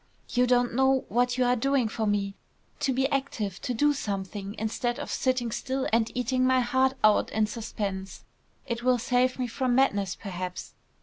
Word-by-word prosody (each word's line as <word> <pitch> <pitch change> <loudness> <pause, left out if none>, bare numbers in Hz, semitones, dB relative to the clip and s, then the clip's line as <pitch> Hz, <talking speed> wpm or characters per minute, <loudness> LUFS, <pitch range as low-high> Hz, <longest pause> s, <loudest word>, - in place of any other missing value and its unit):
"You 250 0 +2
don't 245 -1 +2
know 265 +1 +3
what 245 +1 +1
you 255 - +3
are 245 0 +3
doing 270 0 +1
for 220 0 -2
me! 200 -1 0 0.5
To 270 - +1
be 265 +1 +1
active, 235 -9 -2
to - - -3
do 290 +5 +3
something, 200 -3 -4
instead 235 +3 -2
of - - -5
sitting 255 -3 0
still 265 +3 -2
and 230 0 +2
eating 255 +1 0
my 255 0 +4
heart 260 +2 +2
out 215 -1 +4
in 220 0 +1
suspense. 205 -3 -5 0.4
It 235 -3 -3
will 250 0 +3
save 250 +1 +1
me 255 - -1
from 245 +1 0
madness 205 -8 +2
perhaps. 180 -3 -6
245 Hz, 180 wpm, -27 LUFS, 210-260 Hz, 0.5 s, my